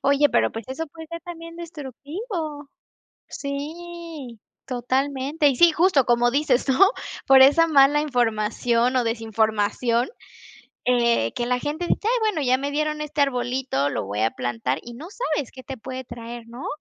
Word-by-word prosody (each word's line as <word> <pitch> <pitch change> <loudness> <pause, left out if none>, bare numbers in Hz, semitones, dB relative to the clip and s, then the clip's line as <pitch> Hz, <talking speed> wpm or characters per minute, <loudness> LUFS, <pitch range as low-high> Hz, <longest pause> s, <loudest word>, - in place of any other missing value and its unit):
Oye, 280 +1 +4
pero - - +2
pues 225 0 -7
eso 320 +5 -4
puede 320 +2 -11
ser 335 +1 -7
también 335 -1 -9
destructivo. 310 - -6 0.6
Sí, 305 -3 -7 0.3
totalmente. 270 +4 0
Y 265 - 0
sí, 340 +4 +6
justo 325 -5 +3
como 240 0 +3
dices, 275 -1 +1
¿no?, 380 +9 +5 0.4
por 265 0 +8
esa 290 +5 +6
mala 290 -1 +5
información 240 -2 +1
o 250 - +2
desinformación, 225 +1 0 0.8
eh, 235 - +2
que 240 - -2
la 250 0 +1
gente 315 +4 -3
dice: - - +1
"Ay - - +3
bueno, 425 -8 0
ya 255 -1 +3
me 280 +1 -3
dieron 305 +1 -1
este 300 0 -3
arbolito, 250 - 0
lo - - -2
voy 100 +2 -3
a 110 - +3
plantar", 120 +2 -2
y 240 - -10
no 300 +8 -9
sabes 305 - -3
qué 260 - -11
te 270 - -7
puede 260 +2 -7
traer, 235 -1 -8
¿no? 240 +3 -8
270 Hz, 165 wpm, -23 LUFS, 240-305 Hz, 0.8 s, por